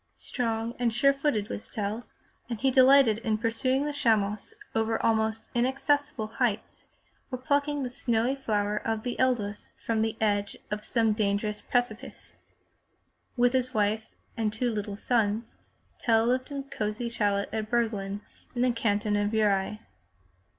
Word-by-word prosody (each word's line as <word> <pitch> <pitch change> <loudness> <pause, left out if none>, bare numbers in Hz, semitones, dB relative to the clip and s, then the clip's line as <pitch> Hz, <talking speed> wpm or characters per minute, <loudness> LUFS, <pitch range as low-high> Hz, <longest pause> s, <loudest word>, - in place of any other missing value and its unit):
Strong 230 -2 -2
and 240 -2 +2
sure 275 +5 +4
footed 275 -7 0
was 210 - -6
Tell 215 +1 -3 0.4
and 230 -3 -3
he 265 +2 +2
delighted 260 -4 +6
in 220 -2 0
pursuing 255 +5 0
the 295 - -2
chamois 215 -6 +1 0.2
over 225 0 +1
almost 220 0 +1
inaccessible 270 +1 +1
heights, 225 -1 -2 0.5
or 255 - -2
plucking 285 +2 0
the 250 - -2
snowy 245 -1 +1
flower 210 -5 -1
of 220 0 -2
the 245 - -2
edelweiss 225 -6 0
from 225 -1 +1
the 220 0 -1
edge 205 -2 0
of 210 0 -3
some 225 -1 +2
dangerous 210 0 -1
precipice. 245 +1 -3 1.0
With 245 +1 +4
his 255 0 0
wife 215 +1 +1 0.3
and 220 -3 0
two 235 +3 -1
little 205 -2 -4
sons 225 -1 0 0.5
Tell 225 -1 +3
lived 255 +3 +1
in 280 -1 -3
a - - -10
cozy 220 -3 -3
chalet 205 -3 0
at 215 -1 -2
Biirglen 210 -4 -1 0.3
in 245 - +1
the 250 - +4
canton 210 -2 0
of 205 0 +1
Uri. 210 -1 +1
225 Hz, 150 wpm, -28 LUFS, 210-250 Hz, 1.0 s, delighted